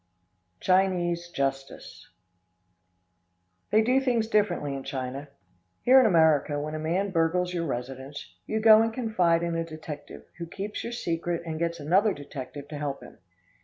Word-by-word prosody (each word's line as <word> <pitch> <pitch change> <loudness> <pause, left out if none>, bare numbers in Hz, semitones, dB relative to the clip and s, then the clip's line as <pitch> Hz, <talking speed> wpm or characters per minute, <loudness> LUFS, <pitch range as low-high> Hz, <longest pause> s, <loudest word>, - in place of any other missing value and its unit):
Chinese 175 -2 +1
Justice. 135 -3 -4 1.6
They 220 +1 +4
do 255 +4 +3
things 240 -4 +1
differently 200 -10 +1
in 135 - -4
China. 130 +2 -5 0.6
Here 260 +2 +7
in 255 - +5
America, 160 -5 +3
when 155 +1 -4
a 155 - -3
man 180 +6 -1
burgles 180 +1 +1
your 170 -2 -2
residence, 130 +2 -6
you 220 - -1
go 220 0 +8
and 225 0 +1
confide 185 -8 +1
in 170 0 -1
a 165 - 0
detective, 155 -2 -9 0.2
who 170 - -5
keeps 200 +4 -5
your 235 - -5
secret 170 -5 -2
and 160 -1 -4
gets 170 0 -2
another 190 +8 +3
detective 140 -1 -8
to 150 -1 -6
help 140 -2 -4
him. - - -14
170 Hz, 155 wpm, -27 LUFS, 145-195 Hz, 1.6 s, go